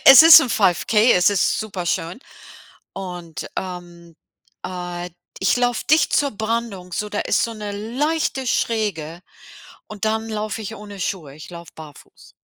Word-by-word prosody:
es 270 +2 +11
ist 325 0 +11
'n 260 - -2
5K, 210 +3 +2
es 180 -1 +4
ist 205 -2 +1
superschön. 180 -2 -3 0.7
Und, 175 -5 -7
ähm, 175 -2 -8 0.5
äh, 180 -1 -6 0.3
ich 190 - +2
laufe 245 -1 0
dicht 310 0 +4
zur 285 -1 +2
Brandung, 220 -4 -4
so 210 +4 -3
da 205 - -4
ist - - +1
so 230 - -4
'ne 210 -2 -6
leichte 265 +6 -2
Schräge 185 -9 -2 0.7
und 210 -1 -6
dann 220 +1 -1
laufe 215 0 -4
ich 220 +1 -6
ohne 205 -1 -10
Schuhe. 170 -6 -4
Ich 155 - -12
laufe 170 -1 -11
barfuß. 155 -2 -14
205 Hz, 150 wpm, -21 LUFS, 175-225 Hz, 0.7 s, es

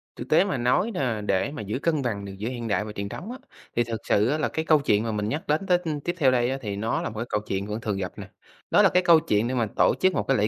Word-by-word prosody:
Thực - - -8
tế 155 - +5
mà 190 -9 -2
nói 125 - +1
là 120 -8 -1
để 100 +5 0
mà 145 - -6
giữ 105 +5 -3
cân 155 -1 0
bằng 105 -6 -3
được 100 - -7
giữa 110 +4 -3
hiện 120 -2 -5
đại 105 -1 0
và 110 - -6
truyền 100 -1 -5
thống 205 - -7
á, 255 - -6 0.4
thì 120 - +3
thực 115 -2 -5
sự 105 +2 +2
á, 150 - +1
là 155 - 0
cái 160 - -3
câu 155 -2 +5
chuyện 105 -6 +2
mà 115 - -2
mình 105 0 -2
nhắc 150 +6 -4
đến 155 +7 0
tết 180 -1 +3
ưm, 155 -3 -2
tiếp 175 +4 -2
theo 135 -5 +4
đây 120 0 +2
á, 135 - -2
thì 105 -4 -4
nó 110 +3 -1
là - - -3
một 110 - -11
cái 115 - -2
câu 105 - 0
chuyện 100 +1 -2
vẫn 105 +2 -4
thường 105 -3 -2
gặp 95 -2 -3
nè, - - -8 0.4
đó - - +6
là - - +6
cái 180 0 +2
câu 170 -2 +7
chuyện 115 -8 0
để 130 - -2
mà 115 -3 +1
tổ - - +4
chức 185 -1 +3
một - - 0
cái 135 - +3
lễ 105 - +2
120 Hz, 340 wpm, -25 LUFS, 105-155 Hz, 0.4 s, câu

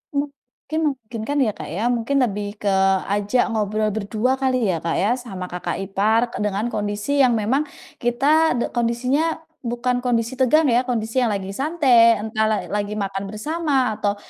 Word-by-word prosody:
Mungkin 280 +1 -4
memungkinkan 245 +1 -5
ya 220 - +1
Kak - - -7
ya, 185 +7 -3
mungkin 245 +3 0
lebih 205 -2 -3
ke 205 - 0 0.4
ajak 205 +4 +1
ngobrol 215 0 0
berdua 220 +5 0
kali 255 -4 +1
ya 165 - -2
Kak 165 0 -1
ya 205 - +2
sama 190 -7 -7
kakak 180 0 -4
ipar 205 +4 +2
ke - - -6
dengan 210 +2 -1
kondisi 205 +7 -2
yang 255 -3 +5
memang 230 +7 +1 0.4
kita 280 +6 +3
de 240 - 0
kondisinya 255 +8 0 0.2
bukan 245 +1 -1
kondisi 235 +1 0
tegang 285 +5 +4
ya, 245 +2 +2
kondisi 225 0 -1
yang 245 - +2
lagi 195 -1 -4
santai, 255 -3 +4
entah 220 0 0
la 215 -1 +1
lagi 205 0 -2
makan 195 -1 -3
bersama 265 +1 -1
atau 205 0 0
230 Hz, 170 wpm, -22 LUFS, 210-260 Hz, 0.4 s, yang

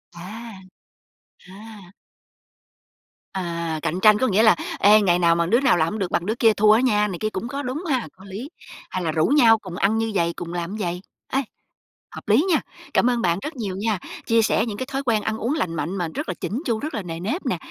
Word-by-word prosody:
À. 215 +6 -9 1.0
À. 205 -2 -12 1.4
À, 170 -3 -3
cạnh 175 +6 -2
tranh 215 +1 +6
có 260 - +2
nghĩa 215 +1 +3
là 220 -5 +6 0.2
"Ê, 210 +2 +6
ngày 180 -3 +3
nào 170 -1 +4
mà 170 0 +1
đứa 230 +8 +3
nào 260 -9 +3
làm 160 -1 +2
hổng 220 - -4
được 190 - -2
bằng 175 - 0
đứa 220 +4 -1
kia 225 -2 +4
thua 210 +1 +4
á 220 +3 +5
nha" 210 -5 +2
này 180 -4 -5
kia, 215 - -1
cũng 215 +3 -5
có 280 +3 -4
đúng 265 +8 -4
ha, 260 -7 -1
có 190 - -17
lý, 205 +9 -7 0.4
hay 185 - -3
là 160 - 0
rủ 155 0 +1
nhau 235 -6 +5
cùng 185 -4 -9
ăn 205 +3 +1
như 225 0 -1
vầy, 170 -2 +1
cùng 175 0 -7
làm 175 +1 -3
như - - -5
vầy. 175 +1 -3 0.3
Ê, 270 - +3 0.8
hợp - - -10
lý 235 - +4
nha. 320 - +3 0.3
Cảm 250 - +3
ơn 240 -1 0
bạn 175 0 +1
rất 305 0 -6
nhiều 205 -6 -4
nha, 210 -3 0 0.3
chia 230 0 +3
sẻ 220 - +2
những 215 -3 -5
cái 260 - -3
thói 270 +1 -2
quen 225 -5 +1
ăn 220 0 -2
uống 240 +6 -1
lành 170 - -2
mạnh 165 +5 -3
mà 175 -2 -1
rất - - -4
là - - -1
chỉn 240 +8 -3
chu, 225 -3 0
rất 305 - -5
là 220 - -2
nề 165 -2 -6
nếp 225 - -3
nè, - - 0
210 Hz, 245 wpm, -23 LUFS, 175-230 Hz, 1.4 s, tranh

